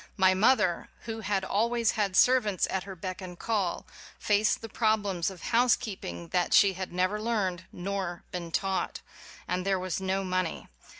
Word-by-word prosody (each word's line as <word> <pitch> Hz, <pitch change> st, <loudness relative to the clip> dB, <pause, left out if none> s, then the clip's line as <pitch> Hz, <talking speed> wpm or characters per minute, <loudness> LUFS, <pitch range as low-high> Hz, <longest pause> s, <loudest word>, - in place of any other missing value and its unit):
My 190 Hz, -1 st, +5 dB
mother, 200 Hz, -3 st, +2 dB
who 225 Hz, -1 st, -5 dB
had 200 Hz, -2 st, -1 dB
al 215 Hz, +5 st, +1 dB
ways 235 Hz, -2 st, +2 dB
had 200 Hz, -3 st, -1 dB
servants 215 Hz, -7 st, +4 dB
at 190 Hz, -1 st, -2 dB
her 195 Hz, -1 st, -7 dB
beck 185 Hz, +2 st, -6 dB
and 180 Hz, -1 st, -8 dB
call, 200 Hz, -6 st, -1 dB, 0.3 s
faced 210 Hz, 0 st, +2 dB
the -, -, -4 dB
problems 205 Hz, -6 st, 0 dB
of 190 Hz, -3 st, -11 dB
housekeeping 225 Hz, -, 0 dB
that 175 Hz, -, +2 dB
she 200 Hz, -1 st, +6 dB
had 185 Hz, 0 st, -5 dB
never 185 Hz, +4 st, 0 dB
learned 195 Hz, -6 st, -1 dB
nor 185 Hz, -2 st, -4 dB
been 170 Hz, -2 st, -5 dB
taught. 190 Hz, +2 st, -1 dB, 0.5 s
And 180 Hz, 0 st, -1 dB
there 195 Hz, 0 st, +1 dB
was 185 Hz, 0 st, -3 dB
no 190 Hz, +1 st, 0 dB
money. 185 Hz, -2 st, -2 dB
190 Hz, 170 wpm, -29 LUFS, 185-215 Hz, 0.5 s, she